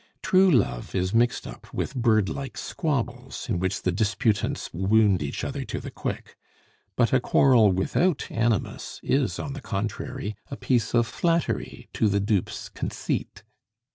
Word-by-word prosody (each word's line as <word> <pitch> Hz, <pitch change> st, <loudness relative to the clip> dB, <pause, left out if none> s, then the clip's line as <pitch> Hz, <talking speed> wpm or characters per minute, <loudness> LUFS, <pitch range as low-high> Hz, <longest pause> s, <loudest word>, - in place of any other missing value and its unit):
True 190 Hz, 0 st, +5 dB
love 95 Hz, -, +1 dB
is 95 Hz, 0 st, 0 dB
mixed 120 Hz, +1 st, +2 dB
up -, -, -10 dB
with -, -, -3 dB
birdlike 120 Hz, +1 st, 0 dB
squabbles, 145 Hz, -8 st, -3 dB
in 90 Hz, -, 0 dB
which 95 Hz, +2 st, -1 dB
the 90 Hz, -, +2 dB
disputants 105 Hz, +2 st, 0 dB
wound 100 Hz, +1 st, +3 dB
each 70 Hz, -1 st, -3 dB
other -, -, -3 dB
to -, -, -4 dB
the -, -, -7 dB
quick; -, -, -5 dB, 0.6 s
but 120 Hz, 0 st, +2 dB
a 130 Hz, -, +5 dB
quarrel 125 Hz, -5 st, +5 dB
without 140 Hz, -, +1 dB
animus 115 Hz, -3 st, -1 dB
is, 135 Hz, -2 st, +1 dB
on 140 Hz, -, -4 dB
the 145 Hz, -, -7 dB
contrary, 110 Hz, +3 st, -4 dB
a 140 Hz, -, -6 dB
piece 120 Hz, -3 st, +1 dB
of 120 Hz, 0 st, +4 dB
flattery 165 Hz, +9 st, -1 dB
to 110 Hz, -, +2 dB
the 100 Hz, 0 st, +2 dB
dupe's 100 Hz, -2 st, -1 dB
conceit. -, -, -4 dB
115 Hz, 150 wpm, -26 LUFS, 100-130 Hz, 0.6 s, True